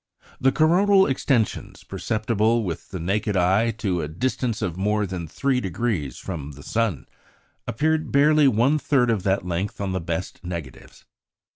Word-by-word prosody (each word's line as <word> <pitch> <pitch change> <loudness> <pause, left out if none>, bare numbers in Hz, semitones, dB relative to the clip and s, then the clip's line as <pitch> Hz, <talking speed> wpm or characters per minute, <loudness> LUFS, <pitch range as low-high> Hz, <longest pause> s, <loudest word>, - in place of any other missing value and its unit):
The 135 +1 +3
coronal 190 +7 +4
extensions, 130 -4 -1
perceptible 110 +1 0
with 85 -5 -5
the 95 - -6
naked 100 +4 -1
eye 95 +6 +3 0.2
to 90 -3 +1
a 75 - -3
distance 115 - -2
of 85 - -2
more 105 +2 0
than 90 -3 -5
3° 100 - -2
from 75 -6 -6
the 70 +1 -13
sun, 110 - -1 0.6
appeared 155 +6 0
barely 150 +1 +5
one 130 +5 +3
third 125 -5 +2
of 110 -4 0
that 95 0 0
length 90 +3 -3
on 100 -2 -2
the 95 -1 -2
best 85 +2 -4
negatives. 85 -8 -8
105 Hz, 150 wpm, -23 LUFS, 90-130 Hz, 0.6 s, barely